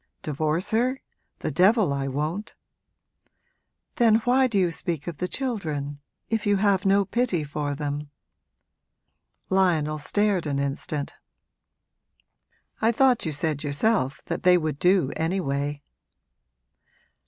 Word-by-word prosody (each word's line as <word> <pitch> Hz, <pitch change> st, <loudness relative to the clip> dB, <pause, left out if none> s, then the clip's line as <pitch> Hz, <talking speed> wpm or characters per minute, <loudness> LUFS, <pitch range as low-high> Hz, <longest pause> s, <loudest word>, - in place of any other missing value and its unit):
'Divorce 155 Hz, +6 st, -1 dB
her? 250 Hz, +4 st, +1 dB, 0.4 s
The -, -, -2 dB
devil 195 Hz, -, +4 dB
I 135 Hz, -1 st, -2 dB
won't!' 155 Hz, -, -3 dB, 1.4 s
'Then 230 Hz, -2 st, +5 dB
why 260 Hz, +2 st, +4 dB
do 225 Hz, -5 st, -1 dB
you 180 Hz, -3 st, +2 dB
speak 165 Hz, -2 st, -3 dB
of 170 Hz, -4 st, -5 dB
the 180 Hz, -, -2 dB
children 155 Hz, -, -3 dB, 0.3 s
if 225 Hz, -2 st, -1 dB
you 205 Hz, -1 st, +3 dB
have 195 Hz, -1 st, +2 dB
no 200 Hz, +1 st, +4 dB
pity 200 Hz, -5 st, 0 dB
for 145 Hz, 0 st, -3 dB
them?' 145 Hz, 0 st, -4 dB, 1.4 s
Lionel 160 Hz, -5 st, +2 dB
stared 200 Hz, +2 st, 0 dB
an 140 Hz, -1 st, -1 dB
instant. 140 Hz, +2 st, -3 dB, 1.7 s
'I 225 Hz, +1 st, +4 dB
thought 250 Hz, -5 st, +3 dB
you -, -, -1 dB
said 150 Hz, 0 st, -2 dB
yourself 145 Hz, -, 0 dB
that -, -, -3 dB
they 180 Hz, 0 st, +6 dB
would 155 Hz, -4 st, -2 dB
do 180 Hz, -6 st, +3 dB
anyway!' 145 Hz, -4 st, -2 dB
175 Hz, 120 wpm, -25 LUFS, 145-205 Hz, 1.7 s, they